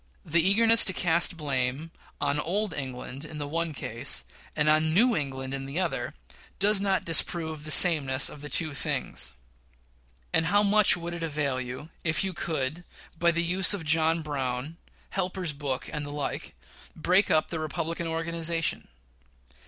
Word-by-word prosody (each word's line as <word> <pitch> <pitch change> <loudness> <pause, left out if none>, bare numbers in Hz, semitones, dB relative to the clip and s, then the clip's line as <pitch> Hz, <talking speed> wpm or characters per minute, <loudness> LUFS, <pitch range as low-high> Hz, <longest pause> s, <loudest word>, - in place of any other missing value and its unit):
The 165 +2 +2
eagerness 225 +5 +5
to 185 - 0
cast 170 0 +3
blame 140 +1 -3 0.3
on 145 0 -1
old 200 +7 -2
England 130 0 -7
in 155 0 -9
the 145 -1 -5
one 165 +2 -2
case, 125 -2 -4 0.3
and 150 0 0
on 155 +1 +2
New 240 +5 +4
England 135 -3 -4
in 135 0 -5
the 140 +6 -2
other, 155 -6 -3 0.4
does 200 0 +4
not 195 -1 0
disprove 160 -2 +1
the - - -7
sameness 145 -6 +7
of 150 - -7
the 145 - -7
two 155 -2 +2
things. - - -3 1.0
And 165 - +2
how 205 +3 +3
much 205 -1 +4
would 170 0 -6
it 170 - -7
avail 145 -5 -2
you, 130 +5 -8
if 160 +3 0
you 190 -1 -2
could, 155 0 -3 0.4
by 170 - +3
the 170 0 0
use 185 +3 +3
of 170 -5 -8
John 160 +1 +1
Brown, 135 +1 -4 0.3
Helper's 185 -3 -2
Book, 140 -3 -4
and 150 -1 -4
the 145 - -7
like, 145 -1 -5 0.4
break 180 +5 +2
up 155 - +2
the 165 - -4
Republican 165 +2 -4
organization? 165 0 -2
160 Hz, 165 wpm, -26 LUFS, 145-175 Hz, 1.0 s, sameness